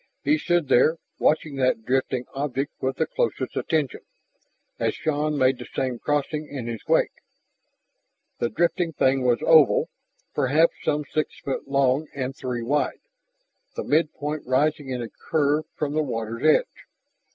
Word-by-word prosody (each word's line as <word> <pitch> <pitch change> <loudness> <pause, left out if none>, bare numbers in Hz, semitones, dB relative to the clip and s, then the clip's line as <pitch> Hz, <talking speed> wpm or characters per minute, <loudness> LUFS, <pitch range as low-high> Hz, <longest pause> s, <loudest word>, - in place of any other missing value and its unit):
He 300 +1 +3
stood 175 - +1
there, 155 +6 +4 0.2
watching 155 -2 +1
that 130 -4 +1
drifting 130 -1 0
object 135 0 -2
with 130 0 -1
the - - +2
closest - - -2
attention, 155 -6 -1 0.8
as - - 0
Shann 150 -1 -1
made 130 -1 +3
the - - -8
same 125 -2 -1
crossing 150 +1 -1
in 135 -5 -6
his 115 -2 -5
wake. - - +3 1.3
The 120 - 0
drifting 170 +1 0
thing 130 -2 +2
was 120 -2 +2
oval, 160 -4 +5 0.4
perhaps 150 +6 +3
some 150 0 0
six 155 +2 -3
feet 135 - -4
long 140 +2 +2
and 135 -1 -3
three 125 -3 -4
wide, 145 +5 0 0.7
the - - -3
mid 155 +1 +2
point 150 +1 -3
rising 145 +2 +1
in 125 -2 -2
a - - -5
curve 150 +3 0
from 145 -2 -2
the 155 - +2
water's 115 -4 -4
edge. 155 0 +2
140 Hz, 150 wpm, -24 LUFS, 130-155 Hz, 1.3 s, oval